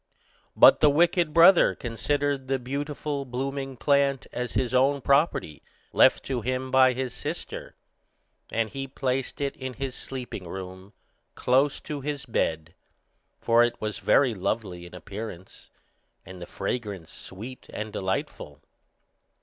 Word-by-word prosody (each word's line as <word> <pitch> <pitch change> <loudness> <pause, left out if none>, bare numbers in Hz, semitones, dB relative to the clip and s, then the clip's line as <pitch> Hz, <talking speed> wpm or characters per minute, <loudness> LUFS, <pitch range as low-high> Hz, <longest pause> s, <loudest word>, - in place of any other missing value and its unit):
But - - +8
the 150 - +6
wicked 170 +2 +3
brother 170 +3 +6
considered 140 +3 -2
the 135 0 +1
beautiful 140 +2 -4
blooming 135 +1 -4
plant 140 +1 +2
as 125 0 -3
his 125 0 0
own 135 +2 +3
property, 140 - +1 0.3
left - - +5
to 130 -3 -2
him 130 +2 -2
by 130 -1 +5
his 130 -1 -3
sister, - - -6 0.8
and 110 -2 -1
he 135 0 -5
placed 130 -1 -2
it 140 -1 -1
in 130 -1 -6
his 135 -2 -4
sleeping 125 -8 -7
room, 95 +2 -8 0.4
close 135 +3 +2
by 150 -1 -6
his 145 0 -4
bed, 80 -8 -1 0.6
for 115 0 +3
it 120 0 -1
was 105 -2 -3
very 130 -4 +3
lovely 95 -3 -3
in 85 - -13
appearance, 95 0 -9 0.6
and 95 0 -11
the 85 - -7
fragrance 100 -5 -4
sweet 115 +7 -10
and 110 0 -5
delightful. 95 0 -4
130 Hz, 135 wpm, -26 LUFS, 105-140 Hz, 0.8 s, But